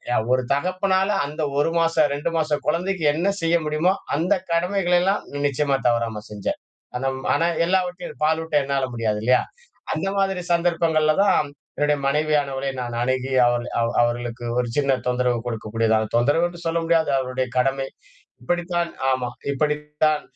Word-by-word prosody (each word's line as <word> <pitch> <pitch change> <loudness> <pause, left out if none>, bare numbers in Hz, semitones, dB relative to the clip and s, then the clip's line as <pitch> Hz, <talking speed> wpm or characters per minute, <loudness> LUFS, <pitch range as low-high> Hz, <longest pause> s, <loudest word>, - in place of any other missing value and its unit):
அ - - +3 0.2
ஒரு 130 0 +2
தகப்பனால 190 +5 +1 0.2
அந்த 150 +3 -5 0.2
1 165 +3 +2
மாச, 165 0 +2 0.2
2 145 +4 -2
மாசக் 155 -2 0
கொழந்தைக்கு 175 +2 0
என்ன 170 +6 -1
செய்ய 165 +1 +2
முடியுமோ 155 +5 +2 0.2
அந்த 175 +7 +2 0.2
கடமைகளை 180 +1 +2
எல்லாம் 195 +3 +1 0.2
நிச்சியமா 140 0 0
தவறாம 115 -3 0
செஞ்சேன். 105 -2 -4 0.4
அந்த 135 +2 -1
ம் 130 - -9
ஆனா 165 - +2 0.2
எல்லாவற்றையும் 180 -4 -2
பாலூட்ட 160 0 0
என்னால 135 -1 0
முடியாது 110 -2 -1
இல்லையா? 125 +1 +4 0.5
அந்த 195 - -2
மாதிரி 195 -1 +1
சந்தர்ப்பங்கள்ல 165 -3 +2
தான் 150 -6 +3 0.3
என்னுடைய 150 0 +1
மனைவியானவளை 140 -2 0
நான் 120 -1 -4
அணுகி 130 +1 -1
அவள் 120 0 0
அவ் 115 0 0
அவர்களுக்கு 120 0 -2
ஒரு 125 - +1
சின்ன 140 -2 +2
தொந்தரவு 125 -1 +1
கொடுக்கக்கூடியதாக, 110 -1 0
தொந்தரவென்று 165 +8 +2
சொல்ல 165 +1 +1
முடியாது. 165 -1 +2
அவர்களுடைய 130 0 -1
கடமை. 135 +1 +1 0.6
இப்டித்தான் 175 +3 -1 0.2
ஆமா. 130 -2 0 0.2
இப்டித்தான் 150 +1 0
150 Hz, 145 wpm, -23 LUFS, 125-170 Hz, 0.6 s, இல்லையா